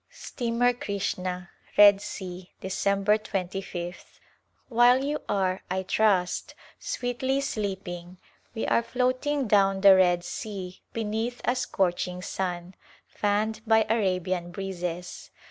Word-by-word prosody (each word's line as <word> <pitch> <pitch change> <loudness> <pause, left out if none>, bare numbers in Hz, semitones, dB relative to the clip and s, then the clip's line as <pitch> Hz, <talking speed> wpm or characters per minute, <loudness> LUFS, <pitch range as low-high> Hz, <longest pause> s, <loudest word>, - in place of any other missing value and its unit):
Steamer 245 0 0
Krishna^ 185 -5 -3 0.3
Red 205 -1 +8
Sea,, 180 -3 -7
Dec. 195 +1 0 0.2
2^th. 185 -3 -5 0.5
While 245 +2 +5
you 295 +2 -1
are, 190 -2 0
I 190 +1 -1
trust, 190 -2 +1 0.2
sweetly 260 +2 -1
sleeping 190 -7 -4 0.4
we 225 - -2
are - - +3
floating 255 +3 0
down 195 -2 +3
the 195 -1 +9
Red 175 -2 +3
Sea 185 0 -6
beneath 225 +2 -2
a 245 - +2
scorching 180 -5 -1
sun, 180 -1 -3 0.3
fanned 215 +1 -1
by 220 0 +5
Arabian 185 -5 0
breezes. 180 -2 -5
195 Hz, 110 wpm, -27 LUFS, 180-225 Hz, 0.5 s, the